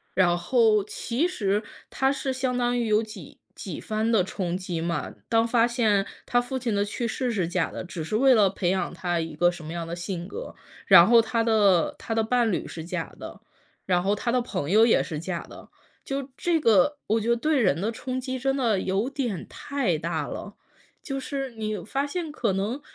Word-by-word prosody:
然 175 -2 +4
后 215 +3 +3
其 240 - -1
实 210 - 0 0.3
它 265 0 +2
是 270 -1 -2
相 255 -1 -1
当 245 0 +1
于 235 - 0
有 215 +1 +3
几 215 -8 -11 0.2
几 185 -6 -7
番 220 +1 -1
的 205 -5 +4
冲 180 -2 -3
击 180 -3 -4
嘛， 170 0 -2 0.2
当 225 0 +3
发 235 0 +3
现 220 -5 +1 0.2
他 245 - +2
父 245 +2 -4
亲 240 -4 -2
的 200 - +2
去 220 +3 -3
世 245 +2 -2
是 190 -7 0
假 175 -1 0
的， - - -6
只 175 -2 -6
是 160 - -3
为 265 +3 +5
了 210 -5 +5
培 180 -2 -1
养 190 - -1
他 175 -2 -1
一 160 -2 -4
个 175 +2 +3
什 175 -2 -10
么 155 +2 -6
样 170 -1 -4
的 170 - -4
性 175 0 -5
格， - - -7 0.3
然 170 - +9
后 235 +1 +7
他 230 0 0
的 205 -7 +3
他 225 - -4
的 225 - +2
伴 235 0 +2
侣 180 - -2
是 160 - -7
假 170 - -5
的， - - -9 0.5
然 180 -1 +2
后 200 +2 +2
他 210 +4 -2
的 250 +1 +2
朋 165 -10 -3
友 220 +3 +6
也 230 - +4
是 155 -4 -4
假 170 +1 -4
的。 - - -13 0.3
就 275 0 -4
这 340 -2 +1
个， 235 - +4
我 220 +1 +2
觉 225 - -2
得 235 - +3
对 300 0 +1
人 185 -7 +2
的 205 +5 -1
冲 255 +3 -4
击 260 0 -4
真 270 +2 0
的 225 -7 +1
有 195 +6 0
点 250 - -3
太 255 - -2
大 165 +2 -3
了， - - -7 0.5
就 275 - -4
是 270 0 -4
你 215 -2 -3
发 275 +5 -1
现 325 +3 -4
可 255 -8 -1
能 205 +9 -2
220 Hz, 235 characters per minute, -26 LUFS, 185-250 Hz, 0.5 s, 然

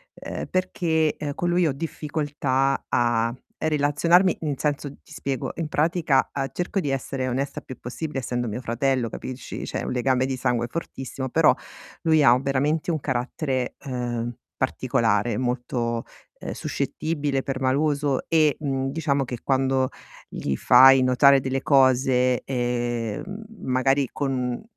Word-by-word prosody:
ehm, - - -6
perché, 165 -4 +1
ehm, 145 -2 -4
con 175 - -1
lui 175 -1 +3
ho 145 - +1
difficoltà 145 -3 -1
a 120 -1 +2 0.3
relazionarmi, 155 +4 +3
nel 150 -3 -1
senso, 145 0 -1
ti - - -15
spiego, 135 -4 -3
in 165 -2 -2
pratica 155 -3 +2
a 135 -1 -2
cerco 180 +3 -2
di 150 - -2
essere 135 -1 -2
onesta 135 +3 -2
il - - -23
più 130 - -9
possibile, 135 +4 -5
essendo 120 -1 -2
mio 110 +2 -4
fratello, 125 +1 0
capisci, 130 +3 -7
c'è - - -4
un - - -3
legame 130 +1 +1
di 130 0 -2
sangue 120 -1 0
fortissimo, 130 -3 -5
però - - +5 0.5
lui 160 -2 +4
ha 120 -2 +7
veramente 140 +4 0
un 160 -2 0
carattere, 130 0 -2
ehm, 120 -2 -3 0.2
particolare. 110 0 +1
Molto, 120 -2 -2 0.3
ehm, - - -5
suscettibile, 145 -4 -2
permaloso 140 +1 0
e, 155 -3 +3
mhmm, 135 -3 -1
diciamo 140 -3 0
che 125 -1 -6
quando 130 -1 +1 0.4
gli 70 - -3
fai 130 - +7
notare 135 +2 +5
delle 130 0 -2
cose, 130 -2 +3
ehm, 120 -3 -2
mhmm, 200 +3 -7 0.3
magari 135 +1 +2
con 130 -3 -2
135 Hz, 145 wpm, -24 LUFS, 125-150 Hz, 0.5 s, ha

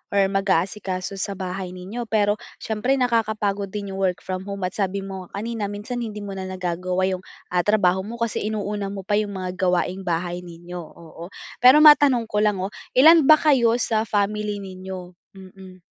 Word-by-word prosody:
or 195 -1 +5
mag-aasikaso 195 0 -1
sa 200 0 -3
bahay 185 0 -5
ninyo. 215 +6 -6
Pero 210 -1 +1 0.2
siyempre 225 +5 -1
nakakapagod 215 -5 0
din 200 -1 -5
yung 190 - -6
work-from-home 190 +1 -3
at 180 - -3
sabi 195 -1 -2
mo 190 -2 -7
nga 200 +2 -6
kanina 225 -3 -3
minsan, 210 +5 -5
hindi 210 -3 -5
mo 200 - -6
na 190 -1 -5
nagagawa 185 0 -2
yung, 185 -1 -2 0.3
ah, 180 -1 +2
trabaho 190 -2 +2
mo, 220 +4 -7
kasi 230 -2 -2
inuuna 205 -1 -3
mo 195 -1 -6
pa 205 - -1
yung 205 -2 -3
mga 185 -1 -3
gawaing-bahay 180 -1 -1
ninyo, 175 0 -9
oo. 165 +1 -12 0.3
Pero 270 +5 +8
matanong 280 -6 +7
ko 210 -1 -1
lang, 210 -2 +2
oh, 200 - -3 0.3
ilan 315 +1 +7
ba 310 - +11
kayo 250 -7 +3
sa 220 -2 0
family 210 0 0
ninyo? 185 -2 -8 0.2
Mm. 185 -1 -14
195 Hz, 175 wpm, -23 LUFS, 185-215 Hz, 0.3 s, ba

